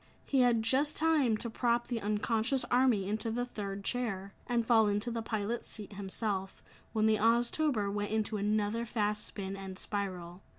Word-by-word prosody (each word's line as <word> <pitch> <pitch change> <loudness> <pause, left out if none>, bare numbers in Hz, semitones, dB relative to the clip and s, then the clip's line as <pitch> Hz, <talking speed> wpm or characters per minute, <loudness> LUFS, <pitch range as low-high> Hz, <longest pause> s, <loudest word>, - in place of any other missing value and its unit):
He 275 - +1
had 240 -3 +4
just 275 +6 +2
time 305 -8 +3
to 235 - -3
prop 235 +1 +1
the 235 -3 -3
unconscious 220 +5 +1
army 245 -6 +3
into 215 +3 -1
the 245 +2 -1
third 200 -4 -5
chair, 200 -5 -2
and 235 -2 +1
fall 225 -2 +5
into 205 +3 0
the 230 0 -2
pilot's 220 +1 -3
seat 210 -1 -7
himself, 195 0 -3 0.3
when 215 -1 +1
the 220 0 +4
Oztober 235 0 +2
went 205 0 -2
into 215 0 0
another 210 +2 0
fast 210 -2 -1
spin 195 -1 -5
and 190 -1 -7
spiral. 185 -4 -4
220 Hz, 170 wpm, -32 LUFS, 205-240 Hz, 0.3 s, fall